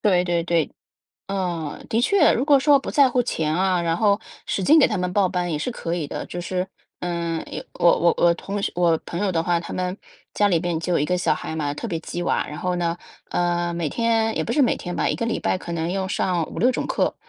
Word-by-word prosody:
对 180 Hz, -4 st, +3 dB
对 175 Hz, -1 st, 0 dB
对， 165 Hz, -3 st, +1 dB, 0.6 s
嗯， 175 Hz, -6 st, -3 dB
的 225 Hz, -, +1 dB
确， 335 Hz, +4 st, +4 dB
如 245 Hz, -, 0 dB
果 285 Hz, -2 st, +6 dB
说 285 Hz, 0 st, +5 dB
不 -, -, -6 dB
在 285 Hz, -3 st, +5 dB
乎 250 Hz, 0 st, +2 dB
钱 160 Hz, -10 st, -1 dB
啊， 185 Hz, 0 st, +2 dB
然 165 Hz, -1 st, 0 dB
后 205 Hz, +1 st, +3 dB, 0.3 s
使 195 Hz, -, -1 dB
劲 310 Hz, -, +6 dB
给 285 Hz, -, +6 dB
他 215 Hz, -, -2 dB
们 180 Hz, 0 st, -2 dB
报 195 Hz, -2 st, +3 dB
班 175 Hz, -1 st, -1 dB
也 155 Hz, -, 0 dB
是 -, -, -2 dB
可 170 Hz, -8 st, -4 dB
以 165 Hz, -4 st, -2 dB
的。 -, -, -5 dB
就 175 Hz, -, -6 dB
是， 180 Hz, +1 st, -2 dB, 0.3 s
嗯， 170 Hz, -2 st, -2 dB
有 -, -, -5 dB
我 170 Hz, -, +4 dB
我 170 Hz, 0 st, +4 dB
我 170 Hz, 0 st, +4 dB
同 200 Hz, +4 st, -5 dB
学 -, -, -1 dB
我 170 Hz, -2 st, +3 dB
朋 170 Hz, -, -4 dB
友 200 Hz, -1 st, +1 dB
的 165 Hz, -1 st, 0 dB
话， 175 Hz, 0 st, +1 dB
他 170 Hz, -, -8 dB
们 185 Hz, +1 st, -2 dB, 0.4 s
家 205 Hz, -, +3 dB
里 175 Hz, -5 st, +2 dB
边 175 Hz, -2 st, -1 dB
就 170 Hz, +1 st, 0 dB
1 145 Hz, -, +1 dB
个 180 Hz, -, 0 dB
小 180 Hz, -, +1 dB
孩 160 Hz, -, -5 dB
嘛， 145 Hz, -2 st, -2 dB
特 190 Hz, -, -5 dB
别 170 Hz, -6 st, -2 dB
激 175 Hz, +2 st, -5 dB
娃， -, -, 0 dB
然 150 Hz, -, -7 dB
后 180 Hz, +2 st, -1 dB
呢， 170 Hz, -1 st, -1 dB, 0.3 s
呃， 175 Hz, 0 st, 0 dB
每 170 Hz, -2 st, -2 dB
天 225 Hz, +3 st, +1 dB
也 -, -, 0 dB
不 -, -, -3 dB
是 280 Hz, +4 st, +4 dB
每 250 Hz, -, +2 dB
天 175 Hz, -1 st, -6 dB
吧， -, -, 0 dB
1 -, -, +1 dB
个 230 Hz, -, -2 dB
礼 230 Hz, -, -1 dB
拜 185 Hz, -, 0 dB
可 170 Hz, -, -7 dB
能 165 Hz, +1 st, -2 dB
用 190 Hz, 0 st, -2 dB
上 180 Hz, -4 st, 0 dB
5，6 250 Hz, -, +2 dB
种 -, -, -3 dB
课， -, -, 0 dB
180 Hz, 265 characters per minute, -23 LUFS, 170-205 Hz, 0.6 s, 果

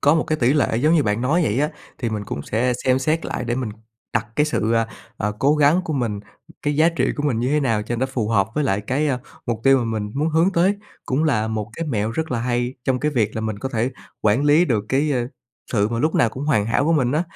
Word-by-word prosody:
có 145 Hz, +2 st, +4 dB
một 160 Hz, -, +1 dB
cái 155 Hz, -, -1 dB
tỷ 125 Hz, 0 st, +3 dB
lệ 140 Hz, -6 st, +1 dB
giống 150 Hz, +7 st, +3 dB
như 160 Hz, -, +4 dB
bạn 105 Hz, -1 st, 0 dB
nói 150 Hz, +8 st, +2 dB
vậy 120 Hz, -5 st, 0 dB
á. 150 Hz, -, +1 dB, 0.3 s
Thì 120 Hz, -3 st, -2 dB
mình 105 Hz, -1 st, -3 dB
cũng 70 Hz, -, -5 dB
sẽ 125 Hz, -, 0 dB
xem 130 Hz, 0 st, +3 dB
xét 155 Hz, +5 st, 0 dB
lại -, -, -3 dB
để 120 Hz, 0 st, -1 dB
mình 125 Hz, -4 st, -3 dB, 0.4 s
đặt 115 Hz, -1 st, +1 dB
cái 150 Hz, -, +3 dB
sự, 115 Hz, -6 st, 0 dB
à, 115 Hz, -1 st, +2 dB, 0.3 s
à, 105 Hz, -, 0 dB
cố 145 Hz, +2 st, +3 dB
gắng 150 Hz, +4 st, +4 dB
của 160 Hz, -, -3 dB
mình, 115 Hz, -7 st, -1 dB, 0.4 s
cái 145 Hz, -1 st, 0 dB
giá 160 Hz, +2 st, +5 dB
trị 170 Hz, -, 0 dB
của 145 Hz, -, -2 dB
mình 125 Hz, -6 st, 0 dB
như 125 Hz, -, 0 dB
thế 150 Hz, +1 st, +2 dB
nào 115 Hz, -6 st, +1 dB
cho 120 Hz, +2 st, -3 dB
nó 130 Hz, -, 0 dB
phù 125 Hz, -5 st, -2 dB
hợp 100 Hz, -3 st, +2 dB
với 150 Hz, -, +1 dB
lại 100 Hz, -6 st, +1 dB
cái, 135 Hz, +8 st, 0 dB
a, 130 Hz, -, 0 dB, 0.3 s
mục 115 Hz, -2 st, -2 dB
tiêu 135 Hz, 0 st, +6 dB
mà 120 Hz, -, -1 dB
mình 110 Hz, -2 st, -3 dB
muốn 150 Hz, +3 st, +1 dB
hướng 165 Hz, +4 st, +2 dB
tới. 185 Hz, +4 st, +3 dB, 0.3 s
Cũng 140 Hz, +5 st, +1 dB
là 110 Hz, -7 st, +1 dB
một 110 Hz, -1 st, -3 dB
cái 165 Hz, -1 st, -3 dB
mẹo 110 Hz, -4 st, 0 dB
rất 160 Hz, +6 st, -3 dB
là 120 Hz, -2 st, -1 dB
hay 120 Hz, +1 st, -1 dB
trong 130 Hz, -1 st, +1 dB
cái 150 Hz, -, +1 dB
việc 110 Hz, -6 st, 0 dB
là 110 Hz, -, -2 dB
mình 110 Hz, -2 st, -3 dB
có 135 Hz, -, -3 dB
thể 120 Hz, 0 st, -1 dB, 0.3 s
quản 110 Hz, +7 st, +2 dB
lý 150 Hz, +4 st, +5 dB
được 110 Hz, -10 st, 0 dB
cái, 145 Hz, +3 st, +1 dB
ơ, 120 Hz, -2 st, 0 dB, 0.5 s
sự 105 Hz, -2 st, +2 dB
mà 115 Hz, 0 st, -2 dB
lúc 155 Hz, +5 st, +1 dB
nào 115 Hz, -, +4 dB
cũng 130 Hz, +5 st, -6 dB
hoàn 120 Hz, -9 st, +2 dB
hảo 115 Hz, +5 st, +1 dB
của 165 Hz, -, +2 dB
mình 135 Hz, -5 st, +2 dB
á. 155 Hz, +3 st, +2 dB
125 Hz, 285 wpm, -22 LUFS, 110-150 Hz, 0.5 s, tiêu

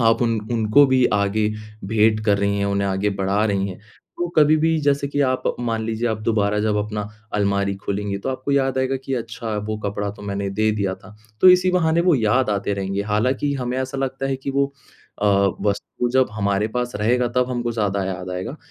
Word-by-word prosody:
आप 115 Hz, +1 st, +3 dB
उन 115 Hz, -1 st, +1 dB
उनको 115 Hz, +5 st, +5 dB
भी 130 Hz, -1 st, +3 dB
आगे 105 Hz, +1 st, +1 dB, 0.4 s
भेंट 110 Hz, +1 st, +2 dB
कर 100 Hz, -1 st, +3 dB
रही 100 Hz, 0 st, 0 dB
हैं, 100 Hz, -, 0 dB
उन्हें 100 Hz, 0 st, 0 dB
आगे 95 Hz, +2 st, 0 dB
बढ़ा 100 Hz, +2 st, 0 dB
रही 100 Hz, -1 st, 0 dB
हैं। 95 Hz, -, -9 dB, 0.4 s
तो 175 Hz, -, -1 dB
कभी 155 Hz, 0 st, +6 dB
भी 160 Hz, +1 st, +2 dB
जैसे 140 Hz, -1 st, +1 dB
कि 145 Hz, 0 st, -1 dB
आप 130 Hz, -2 st, +1 dB, 0.2 s
मान 115 Hz, -2 st, -1 dB
लीजिए 115 Hz, +1 st, -1 dB
आप 110 Hz, -1 st, -1 dB
दोबारा 105 Hz, -2 st, +1 dB
जब 105 Hz, -1 st, +1 dB
अपना 105 Hz, 0 st, -2 dB, 0.3 s
अलमारी 100 Hz, -1 st, +1 dB
खोलेंगी 100 Hz, 0 st, -3 dB
तो 115 Hz, -, -5 dB
आपको 130 Hz, +2 st, -3 dB
याद 135 Hz, -1 st, +1 dB
आएगा 130 Hz, 0 st, 0 dB
कि 135 Hz, -, -2 dB
अच्छा 115 Hz, -2 st, -4 dB
वो 110 Hz, -, -1 dB
कपड़ा 100 Hz, -1 st, -3 dB
तो 105 Hz, 0 st, -12 dB
मैंने 100 Hz, -1 st, -3 dB
दे 110 Hz, +2 st, +1 dB
दिया 100 Hz, -3 st, -1 dB
था। 105 Hz, +2 st, -16 dB, 0.3 s
तो 185 Hz, -, +8 dB
इसी 180 Hz, 0 st, +4 dB
बहाने 165 Hz, -2 st, +2 dB
वो 180 Hz, -2 st, +4 dB
याद 115 Hz, +1 st, +2 dB
आते 100 Hz, 0 st, -1 dB
रहेंगे 100 Hz, 0 st, -2 dB
हालाँकि 125 Hz, +7 st, 0 dB
हमें 125 Hz, -1 st, -3 dB
ऐसा 130 Hz, +1 st, -3 dB
लगता 135 Hz, 0 st, -2 dB
है 135 Hz, -1 st, -1 dB
कि 135 Hz, +1 st, -5 dB
वो 140 Hz, +1 st, +2 dB, 0.6 s
अ, -, -, +3 dB, 0.4 s
वस्तु 105 Hz, +4 st, -1 dB
जब 130 Hz, 0 st, +3 dB
हमारे 100 Hz, 0 st, 0 dB
पास 125 Hz, +1 st, -3 dB
रहेगा 120 Hz, +4 st, +1 dB
तब 125 Hz, 0 st, +2 dB
हमको 120 Hz, -1 st, -2 dB
ज़्यादा 100 Hz, -3 st, -1 dB
याद 90 Hz, -1 st, -4 dB
आएगा। 95 Hz, +11 st, -5 dB
110 Hz, 210 wpm, -22 LUFS, 100-130 Hz, 0.6 s, तो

